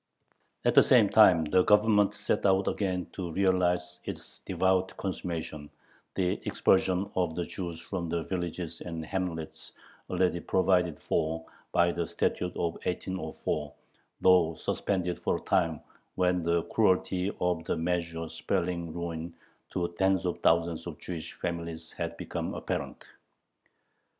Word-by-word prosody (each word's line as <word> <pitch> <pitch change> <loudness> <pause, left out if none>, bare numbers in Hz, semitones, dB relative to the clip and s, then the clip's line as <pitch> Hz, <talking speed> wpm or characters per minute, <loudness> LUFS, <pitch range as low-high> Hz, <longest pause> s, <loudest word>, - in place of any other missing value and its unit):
At - - +4
the - - +9
same - - +5
time 80 -3 +6
the 90 +4 +4
Government 105 0 +4
set - - -1
out 95 0 +3
again 90 -3 -1
to 90 -3 -4
realize 90 -2 +1
its - - -7
devout 95 0 +1
consummation 80 -5 -4 0.5
the 90 -1 0
expulsion 95 0 +2
of 90 -3 0
the 90 - -1
Jews 85 -4 -5
from 85 -1 -4
the 85 0 -1
villages 85 -2 -4
and 85 -2 -5
hamlets 85 -3 -4 0.4
already 90 -1 +1
provided 90 -3 +2
for 80 +1 -1 0.3
by 85 0 +4
the 85 -1 -2
Statute 90 0 -1
of 85 -1 -1
1804, 90 -2 -3 0.5
though 90 -3 +5
suspended 90 -1 -1
for - - 0
a - - -3
time 80 -4 +1 0.4
when 90 -1 +2
the 85 0 +1
cruelty 95 -2 +1
of 90 -2 0
the - - -1
measure 85 -1 -2
spelling 85 0 -2
ruin 85 0 -5 0.3
to 85 -1 -1
tens 95 -2 +3
of 90 - -1
thousands 85 0 +2
of 80 -4 -6
Jewish 85 -3 -6
families 85 -2 -5
had - - -4
become - - -4
apparent. - - -4
90 Hz, 135 wpm, -29 LUFS, 85-95 Hz, 0.5 s, the